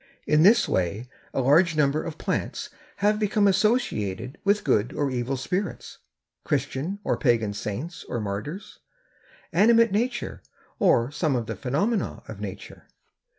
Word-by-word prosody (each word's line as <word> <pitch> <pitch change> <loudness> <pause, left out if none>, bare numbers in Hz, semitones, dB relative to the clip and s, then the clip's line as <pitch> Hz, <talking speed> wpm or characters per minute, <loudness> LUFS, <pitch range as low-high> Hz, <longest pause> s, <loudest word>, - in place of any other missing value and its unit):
In 150 0 +3
this 220 +8 +6
way 100 +7 -1 0.2
a - - 0
large 160 +5 +4
number 150 0 +2
of 160 -1 -6
plants 240 +8 -3 0.3
have 210 0 +3
become 210 -1 +2
associated 185 - 0
with 205 +1 +2
good 105 +3 +1
or 145 -2 -1
evil 125 +2 -2
spirits, 180 +8 -4 0.4
Christian 160 +10 -2
or - - +1
pagan 115 -6 +1
saints 120 - -5
or 120 - -2
martyrs, 105 - -5 0.7
animate 230 +1 +5
nature 240 +5 -2 0.4
or 120 +3 +3
some 150 -2 0
of 120 -2 -1
the - - -4
phenomena 190 - -1
of - - -8
nature. - - -8
150 Hz, 140 wpm, -25 LUFS, 120-205 Hz, 0.7 s, this